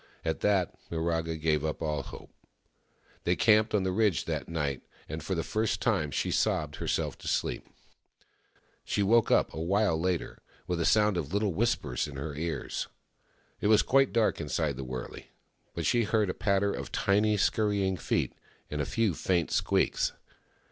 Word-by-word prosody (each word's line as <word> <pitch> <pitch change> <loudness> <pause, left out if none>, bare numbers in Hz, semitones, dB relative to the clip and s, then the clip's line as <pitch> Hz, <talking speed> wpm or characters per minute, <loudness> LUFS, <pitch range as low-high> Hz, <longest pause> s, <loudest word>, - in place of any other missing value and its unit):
At 80 - -1
that, 100 -4 +2 0.2
Miraga 80 0 -1
gave 75 -1 +1
up 80 -1 -2
all 75 -3 -1
hope. - - -11 0.9
They 90 - +2
camped 110 +1 +4
on 100 - +2
the 95 - 0
ridge 100 -3 +1
that - - -3
night; 75 -5 -2 0.3
and 80 +2 -5
for 95 +5 -2
the 80 - -1
first 110 0 -1
time 75 - +1
she 70 - -1
sobbed - - 0
herself - - -2
to - - -9
sleep. - - -1 1.2
She 100 - 0
woke 115 +3 +4
up - - +3
a 80 - -5
while 95 -1 +2
later, 90 -1 -2 0.3
with 90 -1 -2
a - - +1
sound 105 -3 +4
of 75 -3 -3
little 100 -1 +1
whispers 105 - 0
in 70 - -9
her 70 +2 -4
ears. 80 +3 -3 0.7
It - - 0
was 110 0 +5
quite 135 0 +3
dark 115 -7 +1
inside 75 -1 -1
the 70 - -5
wurley; 65 -1 -7 0.5
but - - -2
she 120 -2 +3
heard 105 -3 +1
a - - -6
patter 100 -1 +1
of - - -6
tiny, 105 +2 +2
scurry 105 0 +1
ing 95 - 0
feet, - - -1 0.4
and 75 0 -1
a - - -1
few 115 -5 +1
faint 85 0 0
squeaks. - - +1
90 Hz, 175 wpm, -29 LUFS, 80-105 Hz, 1.2 s, was